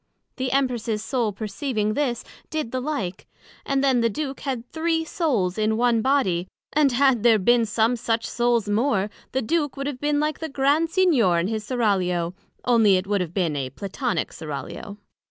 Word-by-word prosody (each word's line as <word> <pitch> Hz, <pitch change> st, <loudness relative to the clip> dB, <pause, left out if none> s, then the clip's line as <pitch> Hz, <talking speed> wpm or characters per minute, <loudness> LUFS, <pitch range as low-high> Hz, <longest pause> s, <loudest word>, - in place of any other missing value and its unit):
The 260 Hz, -1 st, -2 dB
Empress's 240 Hz, -5 st, 0 dB
Soul 240 Hz, -4 st, 0 dB
perceiving 215 Hz, +1 st, -2 dB
this, 250 Hz, -3 st, -1 dB, 0.3 s
did 310 Hz, -7 st, -3 dB
the 255 Hz, -, -1 dB
like: 250 Hz, -10 st, -4 dB, 0.4 s
And 275 Hz, 0 st, +1 dB
then 260 Hz, -3 st, +3 dB
the 230 Hz, -, +3 dB
Duke 275 Hz, +4 st, -4 dB
had 255 Hz, -4 st, -4 dB
three 325 Hz, 0 st, 0 dB
Souls 225 Hz, -, 0 dB
in 215 Hz, 0 st, +1 dB
one 235 Hz, -1 st, +3 dB
Body; 195 Hz, -10 st, +1 dB, 0.3 s
and 295 Hz, -2 st, +4 dB
had 260 Hz, -2 st, +3 dB
there 230 Hz, -1 st, +5 dB
been 230 Hz, +3 st, +3 dB
some 225 Hz, +3 st, +2 dB
such 230 Hz, -1 st, -1 dB
Souls 240 Hz, -3 st, +1 dB
more, 205 Hz, -2 st, +1 dB, 0.2 s
the 265 Hz, 0 st, -1 dB
Duke 290 Hz, +3 st, 0 dB
would 275 Hz, -, -3 dB
have 280 Hz, -3 st, -4 dB
been 295 Hz, 0 st, +1 dB
like 305 Hz, 0 st, -1 dB
the 320 Hz, -, -4 dB
Grand 285 Hz, +4 st, +2 dB
Signior 310 Hz, -, +3 dB
in 170 Hz, -, +1 dB
his 220 Hz, -1 st, -2 dB
Seraglio, 185 Hz, -7 st, 0 dB, 0.3 s
onely 225 Hz, -5 st, +5 dB
it 185 Hz, -, -2 dB
would 200 Hz, -1 st, 0 dB
have 175 Hz, -1 st, -5 dB
been 170 Hz, -6 st, 0 dB
a 135 Hz, -2 st, -2 dB
Platonick 200 Hz, -, -3 dB
Seraglio. 160 Hz, +6 st, -7 dB
235 Hz, 180 wpm, -24 LUFS, 205-275 Hz, 0.4 s, there